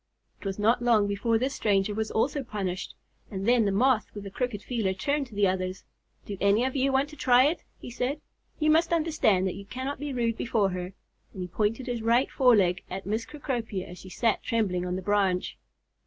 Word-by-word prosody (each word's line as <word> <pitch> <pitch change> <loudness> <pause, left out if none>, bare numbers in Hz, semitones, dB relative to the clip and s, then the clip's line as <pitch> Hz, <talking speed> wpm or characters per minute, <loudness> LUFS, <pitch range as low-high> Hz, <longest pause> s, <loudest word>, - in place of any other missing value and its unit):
It - - -6
was 195 - -3
not 225 +4 +2
long 230 -4 +4
before 205 +3 +1
this 260 +4 -1
stranger 205 -3 +1
also 220 +6 0
was 265 - -7
punished, 190 -3 -4 0.3
and 195 0 -4
then 240 -2 +4
the 200 - +1
Moth 235 +2 +3
with 205 - -6
the 195 - -8
crooked 245 -2 -3
feeler 215 -7 -1
turned 280 +7 -1
to 225 - -14
the 205 0 +3
others. 185 0 -1 0.4
"Do 200 - -6
any 200 +4 +4
of 265 - -2
you 270 0 +2
want 265 +2 +2
to 300 - -11
try 255 -2 +5
it?" 310 +4 0
he - - -9
said. 250 +5 -2 0.4
"You 310 0 +3
must 330 +2 +3
understand 305 - +2
that 185 - -1
you 200 - -9
cannot 260 +5 -4
be 290 0 -4
rude 235 -3 0
before 215 -4 +1
her." 180 0 -5 0.4
And 185 - -5
he - - -5
pointed 215 +7 -1
his 240 -2 -3
right 235 +4 +2
fore 250 -3 +5
leg 180 -3 +2
at 195 - -5
Miss 220 +3 -2
Cecropia 235 -10 -4
as 180 - -10
she 185 - -11
sat 230 +3 0
trembling 185 -6 0
on 180 - -2
the 185 - -4
branch. 195 -3 +1
220 Hz, 220 wpm, -27 LUFS, 195-255 Hz, 0.4 s, try